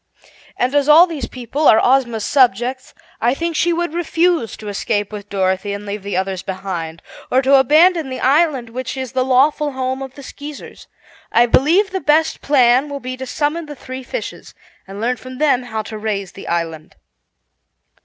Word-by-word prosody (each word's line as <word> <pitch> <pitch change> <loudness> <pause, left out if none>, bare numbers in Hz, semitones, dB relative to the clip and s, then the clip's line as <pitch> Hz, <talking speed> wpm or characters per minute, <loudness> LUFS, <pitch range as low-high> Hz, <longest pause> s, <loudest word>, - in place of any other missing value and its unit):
"And 255 +2 0
as 290 -1 +2 0.2
these 310 -5 -4
people 255 +4 -2
are 220 - +7
Ozma's 240 -4 +2
subjects, 255 0 +1 0.3
I 240 +3 +2
think 335 +2 -3
she 345 +2 +2
would 340 -1 -2
refuse 340 -5 0
to 215 - -10
escape 205 0 -2
with 205 -1 -8
Dorothy 190 +1 -1
and 205 +1 -6
leave 205 0 -5
the 200 -1 -3
others 190 -1 -2
behind, 180 -4 -5 0.3
or 260 +2 +2
to 270 +2 +3
abandon 315 +3 +4
the 260 - -5
island 275 -4 +2
which 255 +2 -5
is 260 -2 -4
the 260 -1 0
lawful 280 +3 +2
home 260 0 -3
of 265 -1 -8
the 280 - -11
Skeezers. 290 +2 -10 0.4
I 235 - +5
believe 330 - +3
the 380 - -3
best 310 +2 +2
plan 260 0 +3
will 285 0 -5
be 255 -1 -6
to 260 0 -7
summon 310 +4 -2
the 295 - -8
three 260 0 -8
fishes 380 - -7 0.3
and 195 +1 -9
learn 245 +3 -1
from 255 +1 -10
them 280 -3 +2
how 220 -3 -4
to 215 +1 -8
raise 200 -3 -3
the 195 - -11
island." 165 -2 -3
255 Hz, 185 wpm, -18 LUFS, 215-290 Hz, 0.4 s, are